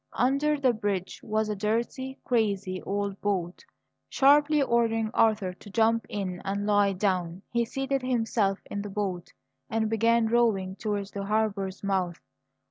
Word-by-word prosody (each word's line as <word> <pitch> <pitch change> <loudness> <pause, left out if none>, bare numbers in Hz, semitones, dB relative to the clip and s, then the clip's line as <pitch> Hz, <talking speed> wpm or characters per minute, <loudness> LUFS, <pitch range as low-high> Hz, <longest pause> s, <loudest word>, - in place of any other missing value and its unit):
Under 280 +4 +2
the 260 -3 +3
bridge 205 -4 -3
was 215 0 -1
a 210 - -2
dirty, 235 +6 -2
crazy 200 -6 0
old 200 0 -3
boat. 185 -4 -2 0.5
Sharply 295 +2 +4
ordering 230 -4 +1
Arthur 210 -5 +2
to 205 - -14
jump 230 +2 +2
in 185 -3 -4
and 200 +1 -2
lie 205 -1 +3
down, 185 -2 -1
he 235 0 +1
seated 270 +3 -2
himself 225 -5 +1
in 205 - -4
the 205 - -6
boat 195 -3 -3 0.4
and 220 -1 0
began 230 +1 +3
rowing 220 -5 +1
towards 205 -1 -3
the 200 -1 -5
harbour's 200 -3 -1
mouth. 185 -3 -1
210 Hz, 145 wpm, -27 LUFS, 195-235 Hz, 0.5 s, Sharply